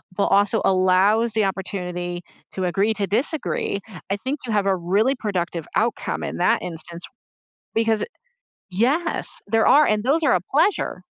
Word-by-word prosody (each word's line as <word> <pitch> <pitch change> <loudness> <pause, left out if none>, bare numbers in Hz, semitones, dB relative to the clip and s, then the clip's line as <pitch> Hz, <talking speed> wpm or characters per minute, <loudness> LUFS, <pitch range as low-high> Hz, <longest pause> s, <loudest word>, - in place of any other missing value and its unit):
but 200 - +1
also 205 +2 +3
allows 190 +5 +3
the 215 -2 +2
opportunity 180 -2 -4 0.3
to 185 - -3
agree 200 +5 +1
to 205 -1 -1
disagree, 235 - -1 0.3
I 200 - +1
think 265 +7 -3
you 230 - -4
have 205 -2 +1
a 195 -1 +2
really 200 +9 +1
productive 180 - -3
outcome 235 +2 -1
in - - -4
that - - +2
instance 170 0 -7 0.7
because 225 -1 +1 0.7
Yes, 275 - 0
there 225 +1 +2
are, 300 +1 +6
and 215 +1 +1
those 310 +5 +2
are 270 - +3
a 180 - +3
pleasure. 395 +7 +1
205 Hz, 155 wpm, -22 LUFS, 185-230 Hz, 0.7 s, are